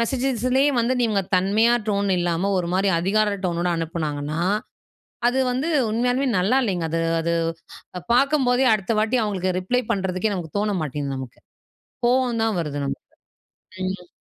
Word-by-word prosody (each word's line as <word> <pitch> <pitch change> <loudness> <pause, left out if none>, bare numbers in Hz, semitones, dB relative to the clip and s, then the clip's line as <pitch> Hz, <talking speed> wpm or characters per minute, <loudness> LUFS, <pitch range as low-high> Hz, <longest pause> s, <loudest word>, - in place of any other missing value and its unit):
மெசேஜஸ்லேயே 260 +2 +1
வந்து, 245 +3 +1
நீங்க 215 -4 +2 0.2
தன்மையா, 215 +6 +3 0.2
டோன் 200 -1 0
இல்லாம 175 +3 0
ஒரு 170 - -4
மாரி, 195 +1 +2
அதிகார 205 +3 +1
டோனோட 175 0 0
அனுப்புனாங்கன்னா, 155 -2 -3 0.9
அது 255 +2 +2
வந்து 260 +6 -1 0.2
உண்மையாலுமே, 245 +5 +1
நல்லா 200 +9 +2
இல்லைங்க. 180 -7 -1
அது 165 - 0 0.2
அது 170 +1 -1 0.8
பாக்கும்போதே, 265 -1 +3
அடுத்த 210 +2 -2
வாட்டி 225 +4 +2
அவங்களுக்கு 185 -3 -1
ரிப்ளை 245 +7 0
பண்றதுக்கே, 190 0 0
நமக்கு 170 -1 -6
தோண 205 -1 0
மாட்டேங்குது, 140 -1 -3
நமக்கு. 130 -2 -9 0.7
கோவந்தான் 235 -4 +1
வருது, 145 -3 -4
நமக்கு. - - -5 0.9
ம். 180 -2 -9
200 Hz, 135 wpm, -23 LUFS, 175-245 Hz, 0.9 s, தன்மையா